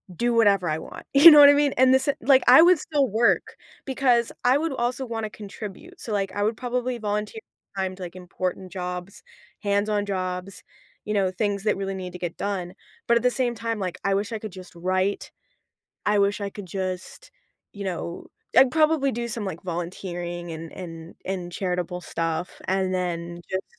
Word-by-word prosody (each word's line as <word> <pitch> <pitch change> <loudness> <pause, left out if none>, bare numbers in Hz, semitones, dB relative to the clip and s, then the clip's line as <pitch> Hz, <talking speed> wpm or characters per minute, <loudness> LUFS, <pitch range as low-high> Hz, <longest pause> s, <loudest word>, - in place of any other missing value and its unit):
do 240 +5 +1
whatever 200 -6 +3
I 155 - 0
want. - - -10
You 295 +4 +11
know 300 - +9
what 285 -1 +10
I - - +7
mean, 285 -1 +2
and 260 0 +6
this, 265 +1 +3
eh, 285 - +3
like 265 +1 +5
I 255 +5 +9
would 355 +1 +6
still 290 -3 0
work 225 +3 +2 0.3
because 250 -3 +2
I 250 +2 +5
would 320 0 -2
also 255 +1 -2
wanna 225 -2 -4
contribute, 210 - -9
so, 225 - -6
like, 195 -2 -1
I 205 - 0
would 220 +1 0
probably 250 0 -2
volunteer 210 - -3 0.4
time 190 -1 -2
to, 185 - -8
like, 175 0 -8
important 185 0 -5
jobs, 180 +1 -6 0.4
hands-on 205 0 0
jobs, 185 -1 -4 0.4
you 210 - -2
know, 195 -3 +1
things 200 0 -1
that 215 - +1
really 195 0 -3
need 185 -2 -6
to 180 - -8
get 175 -2 -4
done, 185 -3 -3 0.3
but 235 - +4
at 235 - -2
the 250 - +4
same 245 -2 -1
time, 230 0 -3
like, 185 -3 -3
I 195 - +1
wish 200 +2 -2
I 220 - -3
could 215 -1 -7
just 185 0 -11
write. 185 +3 -1 0.8
I 210 0 +3
wish 200 +1 +2
I 200 -1 -3
could 200 -1 -9
just, 185 0 -5 0.4
you 200 -1 -7
know 175 -2 -5 0.3
I'd 260 -1 +7
probably 310 -2 +2
do 235 +1 -3
some, 225 -2 -3
like, 185 -4 -5
volunteering 175 0 -5
and 160 0 -8
and 165 -2 -9
and 180 -2 -4
charitable 180 -2 -2
stuff 165 0 -3
and 190 -1 0
then 175 -1 -3
just 190 0 -2
200 Hz, 195 wpm, -25 LUFS, 180-240 Hz, 0.8 s, You